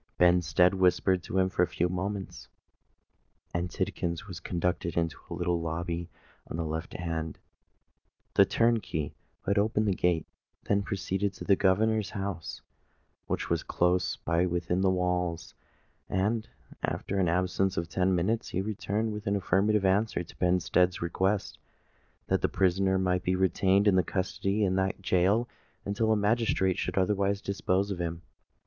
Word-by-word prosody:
Benstead 90 0 +4
whispered 95 0 +2
to 95 - -4
him 95 0 +4
for 95 -1 -1
a 90 - +4
few 85 +1 0
moments; 95 +2 -4 1.1
and 85 +1 -1
Tidkins 85 +1 -3
was 90 -4 -8
conducted 90 -2 -2
into 85 -1 0
a - - -4
little 85 -1 0
lobby 85 +1 -3 0.4
on - - -4
the 85 - -2
left 80 +1 -4
hand. 80 -3 -3 1.0
The - - +7
turnkey, 110 -11 0 0.3
who - - -2
had 100 - +3
opened 110 +1 +1
the 100 - +3
gate, 85 -3 +1 0.4
then 100 0 +1
proceeded 100 0 -2
to - - -8
the 100 - +4
governor's 105 +3 +2
house, 95 -5 -5 0.6
which - - -2
was - - +2
close 90 +1 +1
by 85 +2 0
within 90 +1 -1
the 95 - +3
walls; 90 -2 -1 0.6
and, 105 +4 0 0.3
after 100 - -2
an 90 -3 +2
absence 90 +2 0
of 85 - -1
ten 90 +2 +1
minutes, 105 +7 0
he 95 - -1
returned 105 +1 -2
with 105 -1 -7
an 100 - +2
affirmative 100 +2 +2
answer 95 -1 +2
to 85 - -14
Benstead's 90 0 +2
request 95 +4 -1 0.7
that - - +1
the - - +1
prisoner 95 +1 +2
might 90 -1 +1
be 90 - 0
retained 95 +2 +3
in 95 -2 +5
custody 100 +3 -1
in 95 -1 +1
that 95 0 -1
gaol 100 +7 +3 0.4
until 110 +2 0
a - - +4
magistrate 105 -3 +1
should - - -3
otherwise 100 +1 +1
dispose 100 0 -1
of 95 - -4
him. 85 0 -3
95 Hz, 155 wpm, -29 LUFS, 90-100 Hz, 1.1 s, The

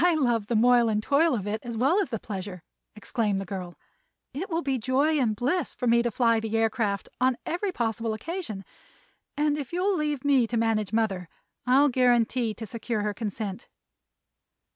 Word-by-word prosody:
"I 350 -2 +4
love 240 -8 +1
the 235 - 0
moil 240 +1 +5
and 215 -1 0
toil 295 +3 +3
of 200 -4 -3
it, 210 +1 -2
as 235 -2 -5
well 275 - +3
as 385 - -2
the 225 - -2
pleasure," 190 -4 -6 0.3
exclaimed 215 -1 -1
the 195 - -3
girl. 180 -2 -6 0.6
"It 340 +9 -4
will 335 -1 -1
be 270 -2 0
joy 275 +6 +2
and 225 -5 +1
bliss 280 - -1
to 250 - -4
me 235 0 +4
to 240 - 0
fly 230 0 +2
the 220 0 -2
aircraft 220 -3 0
on 255 0 +2
every 365 +4 -2
possible 225 - -2
occasion, 220 - -5 0.7
and 295 0 +1
if 275 - -6
you'll 370 +3 +1
leave 295 -4 -2
me 270 -5 +4
to 235 - -2
manage 220 -3 +1
mother 200 -6 -1 0.4
I'll 275 +3 +5
guarantee 245 -2 +2
to 225 - -7
secure 225 0 -3
her 210 0 -1
consent." 210 0 -5
235 Hz, 185 wpm, -27 LUFS, 215-280 Hz, 0.7 s, moil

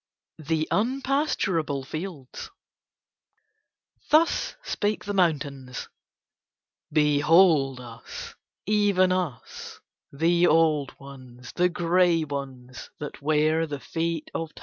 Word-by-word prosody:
THE 155 +1 -1
UNPASTURABLE 230 - 0
FIELDS 155 - -7 1.6
Thus 320 +2 +3
spake 205 +1 -2
the 205 - -3
mountains: 140 -8 -1 1.0
"Behold 150 -1 +4
us, 115 -2 -9 0.3
even 200 -3 +3
us; 175 -10 -4 0.3
the 170 +4 +2
old 155 -3 +2
ones, 130 -3 -12
the 180 0 +2
grey 175 -1 +2
ones, 135 -4 -7
that 145 -1 -8
wear 155 +2 +2
the 145 -2 -5
feet 165 +1 -3
of 165 -1 -5
Time. - - -12
160 Hz, 95 wpm, -25 LUFS, 140-180 Hz, 1.6 s, Behold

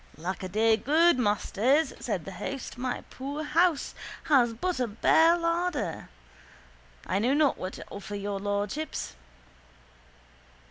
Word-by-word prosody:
—Lackaday, 195 +6 0
good 320 +1 +4
masters, 245 +7 +2
said - - -3
the - - -6
host, 275 -1 -6
my 250 0 -3
poor 280 +4 -5
house 320 0 +2 0.3
has 255 -6 +4
but 335 +8 -2
a 250 - +1
bare 320 +10 +4
larder. 335 -6 -2 1.0
I 190 - 0
know 250 +6 +2
not 295 -2 +2
what 185 +1 -4
to - - -9
offer 205 +1 -7
your 200 0 -3
lordships. 205 - -3
255 Hz, 125 wpm, -28 LUFS, 205-310 Hz, 1.0 s, good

